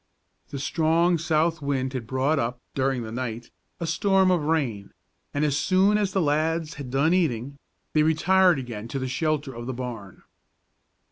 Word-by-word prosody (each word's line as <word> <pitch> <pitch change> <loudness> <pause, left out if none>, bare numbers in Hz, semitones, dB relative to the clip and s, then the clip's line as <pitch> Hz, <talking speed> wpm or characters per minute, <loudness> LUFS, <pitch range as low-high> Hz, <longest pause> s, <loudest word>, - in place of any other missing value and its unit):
The 140 - -5
strong 165 +4 +2
south 160 0 +1
wind 135 -2 -1
had 125 -4 -5
brought 135 +4 +1
up, 120 +1 -2
during 130 -2 0
the 110 - -7
night, 120 -1 -5 0.3
a 170 - -2
storm 190 +3 +3
of 175 -3 +2
rain, 130 -11 -1 0.4
and 145 +1 0
as 145 -2 +1
soon 190 +6 +3
as 205 -2 +1
the 190 - +1
lads 155 +1 0
had 140 -4 -8
done 140 +6 +2
eating, 140 -6 -1 0.3
they 155 - +4
retired 175 +3 +4
again 115 -4 -6
to 135 - -4
the 130 -1 -2
shelter 145 0 -1
of 120 0 -7
the 130 - -3
barn. 115 -6 -7
145 Hz, 175 wpm, -25 LUFS, 130-165 Hz, 0.4 s, they